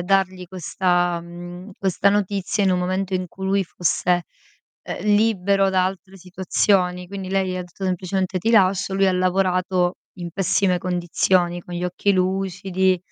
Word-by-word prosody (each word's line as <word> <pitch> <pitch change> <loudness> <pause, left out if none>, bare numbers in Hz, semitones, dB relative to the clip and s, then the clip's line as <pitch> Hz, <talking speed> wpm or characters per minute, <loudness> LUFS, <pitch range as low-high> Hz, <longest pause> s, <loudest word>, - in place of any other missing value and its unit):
dargli 185 0 +1
questa 175 -1 0
mhmm, 175 +3 -9
questa 195 +1 +2
notizia 200 0 0
in 190 - +3
un 180 - +2
momento 185 +1 -1
in 185 0 -1
cui 190 - -8
lui 195 0 +1
fosse, 175 +1 0 0.6
ehm, - - -6
libero 200 -2 +3
da 185 -1 +2
altre 190 +1 -7
situazioni. 180 0 0
Quindi, 195 -1 -6
lei 190 -1 +1
gli 185 - -3
ha 180 - -3
detto 180 +2 -9
semplicemente: 185 +1 -1
"Ti 220 +6 0
lascio", 190 -3 +3
lui 195 0 +3
ha 190 - +3
lavorato 185 -1 +1 0.2
in 175 -1 -5
pessime 185 0 +1
condizioni, 175 0 +1
con 175 - -9
gli 175 +1 -3
occhi 190 +3 0
lucidi 190 0 0
185 Hz, 160 wpm, -22 LUFS, 180-195 Hz, 0.6 s, in